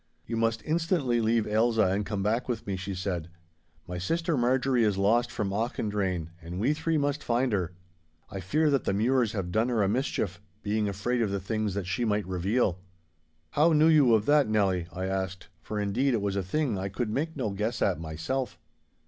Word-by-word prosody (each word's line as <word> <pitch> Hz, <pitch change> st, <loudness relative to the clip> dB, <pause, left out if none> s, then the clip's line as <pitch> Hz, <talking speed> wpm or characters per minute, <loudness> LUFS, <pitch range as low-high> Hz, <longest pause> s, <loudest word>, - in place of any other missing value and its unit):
'You 115 Hz, -, -4 dB
must 115 Hz, 0 st, 0 dB
instantly 160 Hz, -7 st, +1 dB
leave 110 Hz, 0 st, +2 dB
Ailsa 110 Hz, +1 st, +2 dB
and 100 Hz, +2 st, +1 dB
come 100 Hz, -3 st, -2 dB
back 115 Hz, +5 st, 0 dB
with 115 Hz, -3 st, -2 dB
me,' 100 Hz, -, -2 dB
she 95 Hz, +1 st, -5 dB
said. 90 Hz, -3 st, -3 dB, 0.6 s
'My 90 Hz, 0 st, -4 dB
sister 165 Hz, -, 0 dB
Marjorie 125 Hz, 0 st, +2 dB
is 105 Hz, -3 st, +2 dB
lost 115 Hz, +5 st, +3 dB
from 105 Hz, -5 st, -2 dB
Auchendrayne, 100 Hz, -6 st, -1 dB
and 85 Hz, +3 st, -6 dB
we 130 Hz, +8 st, +2 dB
three 160 Hz, +1 st, 0 dB
must 145 Hz, 0 st, -1 dB
find 125 Hz, +2 st, +1 dB
her. 90 Hz, -3 st, -1 dB, 0.6 s
I 100 Hz, -, -5 dB
fear 150 Hz, -, +1 dB
that 140 Hz, -4 st, +1 dB
the -, -, +1 dB
Mures 120 Hz, +1 st, +2 dB
have 95 Hz, -4 st, -3 dB
done 110 Hz, +6 st, +1 dB
her 115 Hz, -4 st, +2 dB
a -, -, +2 dB
mischief, 105 Hz, -, -1 dB, 0.2 s
being 105 Hz, 0 st, 0 dB
afraid 120 Hz, +5 st, -1 dB
of 110 Hz, -, +1 dB
the 100 Hz, 0 st, -1 dB
things 105 Hz, 0 st, -2 dB
that 100 Hz, -2 st, -2 dB
she 95 Hz, +6 st, -1 dB
might 105 Hz, -2 st, 0 dB
reveal.' 95 Hz, +1 st, 0 dB, 0.7 s
'How 160 Hz, +3 st, +4 dB
knew 155 Hz, +1 st, +5 dB
you 140 Hz, -7 st, +6 dB
of 105 Hz, -1 st, +1 dB
that, 145 Hz, -4 st, +4 dB
Nelly?' 95 Hz, -5 st, +1 dB
I 95 Hz, +2 st, -4 dB
asked, 95 Hz, -2 st, -3 dB
for, 105 Hz, +5 st, -4 dB
indeed, 120 Hz, +6 st, +1 dB
it 110 Hz, -, -1 dB
was 100 Hz, -1 st, -1 dB
a 100 Hz, -, +1 dB
thing 115 Hz, +2 st, -1 dB
I 95 Hz, +1 st, -3 dB
could 105 Hz, +3 st, -3 dB
make 155 Hz, +6 st, -2 dB
no 115 Hz, -7 st, -1 dB
guess 110 Hz, +4 st, -2 dB
at 95 Hz, -4 st, +1 dB
myself. 80 Hz, +8 st, -3 dB
110 Hz, 205 wpm, -28 LUFS, 95-125 Hz, 0.7 s, you